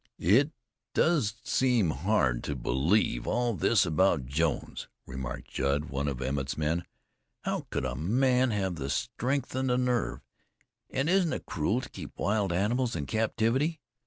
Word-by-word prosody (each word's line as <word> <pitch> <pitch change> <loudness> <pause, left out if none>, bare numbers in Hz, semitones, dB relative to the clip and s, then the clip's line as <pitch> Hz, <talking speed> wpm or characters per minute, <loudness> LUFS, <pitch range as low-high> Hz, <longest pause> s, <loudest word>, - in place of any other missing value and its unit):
"It 125 - +4 0.4
does 145 - +2
seem 125 - +2
hard 75 - +1
to 70 - -2
believe 65 - +1
all 120 +1 +1
this 105 0 +3
about 85 -4 +2
Jones," 75 +5 -1 0.2
remarked 65 -1 -6
Judd, 75 +3 0
one 70 +1 -1
of 65 -2 -2
Emmett's 65 +1 -2
men. 80 +3 0 0.6
"How - - -2
could - - -2
a 65 - -2
man 125 - +2
have 95 -5 -1
the 70 -1 -4
strength 120 - -1
and 130 0 0
the 125 - +2
nerve? 125 -2 0 0.7
And 135 +3 -1
isn't 180 -2 +3
it - - -5
cruel 100 +10 0
to - - -8
keep - - -9
wild 100 -2 +1
animals 115 +7 +1
in 75 -4 -2
captivity? 115 - 0
100 Hz, 155 wpm, -29 LUFS, -, 0.7 s, It